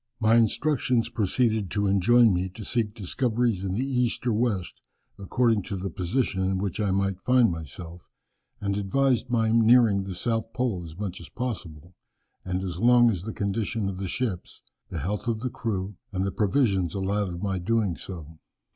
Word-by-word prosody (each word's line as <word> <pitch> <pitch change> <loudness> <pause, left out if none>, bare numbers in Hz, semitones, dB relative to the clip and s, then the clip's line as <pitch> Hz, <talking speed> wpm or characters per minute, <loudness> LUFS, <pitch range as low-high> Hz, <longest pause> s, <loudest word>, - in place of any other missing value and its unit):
"My 110 -1 +3
instructions 115 +1 +2
proceeded 110 -2 +1
to 100 +2 0
enjoin 110 +3 +5
me 90 +1 -1
to 110 - -7
seek 110 -1 -1
discoveries 115 0 0
in 95 -1 -2
the 125 +5 0
east 125 -3 0
or 120 - +2
west, 105 -5 -1 0.4
according 115 +2 +1
to 100 - -4
the 95 +1 -4
position 95 +1 -1
in 95 0 0
which 100 +1 -3
I 105 -2 +1
might 95 0 0
find 125 0 +4
myself, 85 +2 -8 0.5
and 100 -1 -1
advised 125 +5 +1
my 115 -2 +2
nearing 115 -3 +5
the 95 -2 -5
south 115 +3 -2
pole 120 -8 -1
as 80 -1 -10
much 95 -4 -5
as 85 - -11
possible, 90 - -6 0.5
and 95 0 -2
as 90 -2 -4
long 120 +1 +6
as 90 -6 -3
the 110 +4 -5
condition 100 +1 -2
of 95 - -5
the 95 - -3
ships, 100 -4 -4 0.3
the - - -4
health 105 +5 -3
of 115 -2 -1
the 125 0 -2
crew, 100 -5 -3
and 95 -1 -1
the 100 - -1
provisions 100 - +1
allowed 100 +1 -1
of 85 +2 -6
my 95 -2 -1
doing 100 -1 0
so. 80 -4 -9
105 Hz, 180 wpm, -26 LUFS, 95-115 Hz, 0.5 s, long